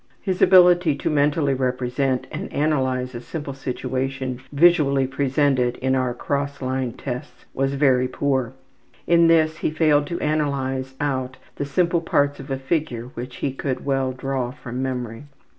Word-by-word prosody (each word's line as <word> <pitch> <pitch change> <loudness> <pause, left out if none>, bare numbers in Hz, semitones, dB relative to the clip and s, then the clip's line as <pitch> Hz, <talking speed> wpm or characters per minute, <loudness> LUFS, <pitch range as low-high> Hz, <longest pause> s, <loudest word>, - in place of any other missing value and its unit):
His 190 -2 -3
ability 180 -4 +6
to 140 - -2
mentally 145 -1 +2
represent 130 0 -1
and - - -5
analyze 130 -4 0
a 120 - -6
simple 145 0 -6
situation 130 0 -3
visually 145 -3 +4
presented 135 -2 +1
in 130 0 0
our 130 -2 0
``Cross 140 +2 -2
Line 130 -2 -2
Tests'' 125 -1 -7
was 135 +1 0
very 130 -3 +3
poor. 130 -3 -1 0.5
In 170 -1 +5
this 160 -1 +3
he - - -1
failed 150 -2 +2
to 170 - -4
analyze 135 -3 -1
out 130 -3 -2 0.2
the 145 - -2
simple 170 +3 +1
parts 145 -3 +1
of 135 +1 -9
a 135 - -1
figure 135 -4 -2
which 125 +1 -7
he 135 - -1
could 135 -1 -3
well 135 -2 0
draw 130 -1 -3
from 125 -1 -6
memory. 125 -1 -4
135 Hz, 155 wpm, -23 LUFS, 130-145 Hz, 0.5 s, ability